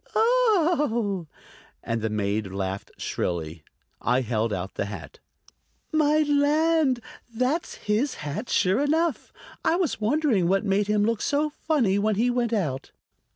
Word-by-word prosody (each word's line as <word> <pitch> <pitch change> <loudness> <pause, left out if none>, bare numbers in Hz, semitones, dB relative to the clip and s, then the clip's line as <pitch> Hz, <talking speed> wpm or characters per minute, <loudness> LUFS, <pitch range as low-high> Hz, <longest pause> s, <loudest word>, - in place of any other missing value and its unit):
"Oh!" 325 - +2 0.6
And 115 -1 -2
the 110 - -1
maid 105 0 -1
laughed 95 0 -4
shrilly. 80 -2 -3 0.4
I 125 +2 +2
held 115 -2 -1
out 95 0 -4
the - - -2
hat. 95 -8 -9 0.7
"My 310 0 +3
land! 295 -2 +2 0.3
that's 255 +8 -1
his 220 +7 -1
hat, 150 - -5
sure 190 +3 +2
enough. 310 -1 0 0.3
I 330 - +3
was 345 -10 -1
wondering 230 - +2
what 195 +4 +1
made 200 0 +1
him 210 0 +2
look 230 -1 0
so 295 +1 0 0.2
funny 235 -11 +2
when 215 +1 +1
he 240 +4 +2
went 240 -2 0
out." 155 - -2
215 Hz, 140 wpm, -25 LUFS, -, 0.7 s, My